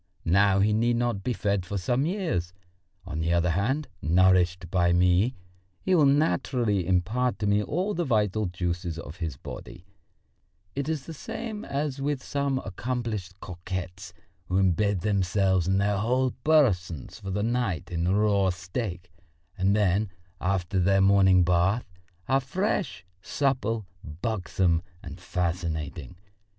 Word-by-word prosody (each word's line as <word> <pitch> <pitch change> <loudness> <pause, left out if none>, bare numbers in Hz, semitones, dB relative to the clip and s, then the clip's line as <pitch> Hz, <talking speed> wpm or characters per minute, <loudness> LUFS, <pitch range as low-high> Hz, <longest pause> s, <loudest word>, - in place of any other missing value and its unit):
Now 95 +3 +4
he 105 +1 +3
need 120 +2 +2
not 120 -4 -1
be 125 - -1
fed 100 -5 0
for 100 +3 -4
some 125 - 0
years. 165 - -2 0.5
On 80 -4 -4
the 80 +1 0
other 85 0 +2
hand, 130 - 0
nourished 90 0 +3
by 85 -1 +3
me, 90 +7 +3 0.4
he 185 - 0
will 155 -5 +5
naturally 125 - +1
impart 105 +8 +1
to 105 - -3
me 100 +1 +3
all 180 - -1
the 175 - -1
vital 110 - +1
juices 85 -1 -3
of 85 0 -8
his 80 -6 -4
body; 85 - -9 0.9
it 140 +2 -3
is 155 -4 -2
the 165 - -7
same 215 +7 -6
as 140 -1 -3
with 140 -2 -1
some 140 -2 -1
accomplished 105 -3 -4
coquettes 90 0 -6 0.4
who 90 - -2
embed 95 +1 +2
themselves 95 -2 +1
and 95 +1 +2
their 100 0 +1
whole 125 +4 +1
persons 95 - +2
for 95 - -7
the 100 +2 -1
night 115 -9 -1
in 85 0 -1
raw 100 0 +3
steak, 90 0 -5 0.4
and 95 +2 +2
then, 105 0 +2 0.3
after 95 0 0
their 95 +2 +3
morning 95 -2 +5
bath, 90 +6 +2 0.4
are 135 - +3
fresh, 155 - -2 0.2
supple, 115 -4 -1 0.4
buxom 90 -6 +1 0.2
and 85 0 -9
fascinating. 85 -5 -3
100 Hz, 140 wpm, -27 LUFS, 90-120 Hz, 0.9 s, will